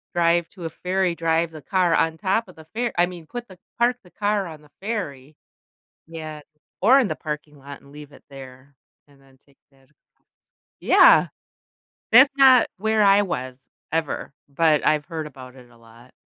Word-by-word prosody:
drive 170 0 +2
to 180 -4 -10
a - - -3
ferry, 185 +1 -1
drive 165 0 0
the 155 -2 -11
car 180 -1 +1
on 160 0 0
top 205 +4 -1
of 185 - -16
the 160 - -15
ferr 240 +1 -1
I 175 - +4
mean, 175 -3 -10
put 240 +3 -7
the 185 - -15 0.2
park 240 +1 +2
the 180 - -20
car 205 -2 -1
on 155 -2 -11
the 150 - -22
ferry. 155 - -5 0.7
Yeah, 155 -2 -8 0.4
or 255 +7 +6
in 245 - 0
the - - -4
parking 150 -1 -7
lot, 140 0 -11
and 140 0 -19
leave 150 -1 -12
it - - -18
there, 135 0 -13 0.3
and 140 -1 -24
then 135 -1 -24
take 140 -1 -29
that 135 0 -27
across. 150 - -40 0.3
Yeah. - - +6 0.8
That's 265 +4 +8
not 260 -3 +6
where 220 +1 +1
I 200 0 +5
was 130 -9 -5 0.3
ever, 160 -4 -3 0.2
but 155 +1 +1
I've 150 -1 +2
heard 160 -3 -6
about 130 -2 -13
it 125 -1 -16
a 120 - -21
lot. 115 +2 -19
165 Hz, 190 wpm, -22 LUFS, 140-195 Hz, 0.8 s, That's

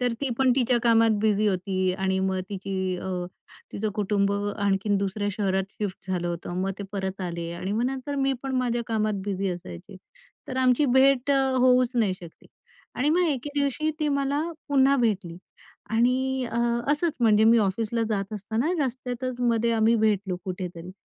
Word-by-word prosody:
तर 245 -1 +1
ती 275 - -1
पण 265 -1 +4
तिच्या 250 -1 +3
कामात 230 -1 +4
बिझी 215 -1 +2
होती 185 -1 0
आणि 190 0 -1
मग 190 -1 -1
तिची 190 -2 -3
अ, 190 - -5 0.6
तिचं 215 +1 -2
कुटुंब 200 -1 +1 0.3
आणखीन 200 0 +1
दुसऱ्या 200 +1 -2
शहरात 195 -2 0 0.2
शिफ्ट 190 -2 -5
झालं 175 -1 -1
होतं. 175 +1 -4
मग 195 - -1
ते - - -4
परत 190 -1 -3
आले 170 -2 -4
आणि 185 +3 -4
मग 225 +3 0
नंतर 270 +2 -4
मी 270 0 +1
पण 270 -1 -3
माझ्या 240 -1 0
कामात 215 -2 0
बिझी 195 -1 -2
असायचे. 175 - -8 0.5
तर 260 - -4
आमची 255 +2 +3
भेट 270 0 +4
अ, 275 -1 +4 0.2
होऊच 250 0 +3
नाही 210 -5 +2
शकली 170 -3 -14 0.5
आणि 280 +4 0
मग 355 +2 +3
एके 285 -1 -2
दिवशी 280 +3 0
ती 305 -2 0
मला 280 0 0 0.3
पुन्हा 275 -1 +4
भेटली 200 -9 0 0.5
आणि 255 +3 +1
अ, 235 - -5 0.4
असंच 310 +2 -1
म्हणजे 220 -2 +5
मी 230 +1 +6
ऑफिसला 220 +3 0
जात 200 -1 -2
असताना 220 +6 -2 0.2
रस्त्यातच 250 0 -4
मध्ये 235 -1 +2
आम्ही 225 +1 +3
भेटलो 205 -4 +1
कुठेतरी 180 -2 -6
220 Hz, 170 wpm, -26 LUFS, 190-255 Hz, 0.6 s, मी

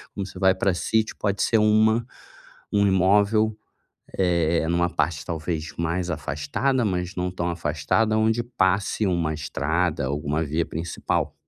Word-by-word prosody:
como 100 - -3
você 95 -1 -10
vai 95 -1 +4
pra 95 0 +1
sítio 110 +4 0
pode 100 -1 0
ser 115 - +3
uma 110 +2 +3 0.7
um 100 0 +4
imóvel, 105 +3 +3 0.6
eh, 85 -3 +1
numa 85 0 +2
parte 75 -2 -1
talvez 80 -1 -4
mais 85 +2 -1
afastada, 80 - -1
mas 90 -1 -2
não 90 0 -1
tão 90 -1 -2
afastada 85 +7 0
onde 110 +2 +2
passe 100 -3 0
uma 85 -4 0
estrada, 80 +1 -1
alguma 75 +3 -1
via 80 +2 -1
principal. 80 +2 -3
90 Hz, 140 wpm, -24 LUFS, 80-105 Hz, 0.7 s, vai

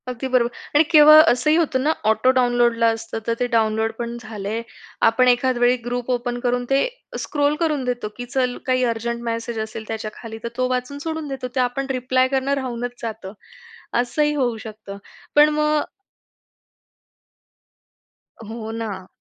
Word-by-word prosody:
अगदी 250 +1 -4
बरोबर! 250 -2 +2 0.3
आणि 295 - +7
केवळ 305 -1 +9
असंही 250 +6 +2
होतं 275 -6 +1
ना, 305 - +3 0.2
ऑटो 220 +4 +3
डाउनलोडला 240 -2 +3
असतं, 225 0 -2
तर 230 - +2
ते 245 - +1
डाउनलोड 220 -1 +1
पण 235 0 -4
झाले. 215 0 -5 0.5
आपण 255 +3 +2
एखाद 250 +1 +3
वेळी 245 +1 +4
ग्रुप 245 0 -3
ओपन 245 0 -2
करून 245 0 -1
ते 270 - +3 0.3
स्क्रोल 290 0 0
करून 305 -5 0
देतो 245 -3 -2
की 245 - -5
चल 250 0 -1
काही 255 -1 +1
अर्जंट 235 +1 -4
मेसेज 230 0 -3
असेल 220 0 -5
त्याच्याखाली, 220 0 -6
तर - - -2
तो 255 0 +1
वाचून 255 +2 -2
सोडून 320 0 -4
देतो. 270 -2 -5
ते - - +1
आपण 250 +2 0
रिप्लाय 255 0 +1
करणं 270 +1 0
राहूनच 245 -1 -5
जातं. 220 -4 -6 0.7
असंही 295 +5 +1
होऊ 245 -5 0
शकतं, 215 -2 -9 0.4
पण 295 +1 +7
मग 300 0 +2 2.7
हो 225 -1 -6
ना. 210 -5 -5
245 Hz, 155 wpm, -21 LUFS, 230-260 Hz, 2.7 s, केवळ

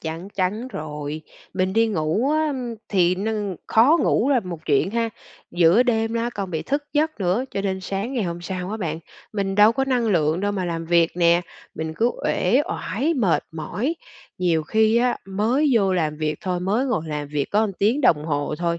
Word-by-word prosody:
Chắn 165 +3 -5
chắn 205 +5 -2
rồi. 150 - -6 0.3
Mình 185 0 0
đi 225 +2 +3
ngủ 205 - 0
á, 310 +1 +2
ưm, 255 -5 -3
thì 180 -3 +3
nưng 205 -1 -2
khó 250 +9 +5
ngủ 255 - +2
là 265 -3 +4
một 180 -5 -6
chuyện 145 +5 +2
ha, 230 +1 0 0.4
giữa 175 +6 +5
đêm 225 -2 0
á 230 +1 -1
còn 195 -2 -4
bị 160 -3 -2
thức 285 +2 -2
giấc 310 -4 0
nữa, 190 +7 +1
cho - - -2
nên 190 -1 -2
sáng 195 +6 -3
ngày 245 -4 0
hôm 170 -1 -4
sau 180 +1 -5
á 215 - -3
bạn, 165 -7 -3 0.3
mình 195 -2 -1
đâu 210 +2 +6
có 270 +3 0
năng 250 -3 +1
lượng 165 -4 +2
đâu 205 +1 0
mà 190 -2 -2
làm 165 -1 -3
việc 170 0 +3
nè, 170 0 +4 0.3
mình 160 0 -4
cứ 230 +7 +2
uể 210 +10 +2
oải, 290 +10 -1
mệt 205 - +1
mỏi. 195 - -3 0.4
Nhiều 170 -3 +1
khi 220 +7 +2
á, 245 +1 +2
mới 230 +10 +1
vô 200 -5 +3
làm 155 -4 0
việc 155 0 -1
thôi, 180 -2 -2
mới 210 +9 0
ngồi 245 -11 0
làm 150 -1 -4
việc 145 -1 -1
có 215 +1 +2
tiếng 225 +8 +2
đồng 150 - +3
hồ 145 -1 -1
thôi, 170 -1 -1
195 Hz, 210 wpm, -23 LUFS, 170-230 Hz, 0.4 s, đâu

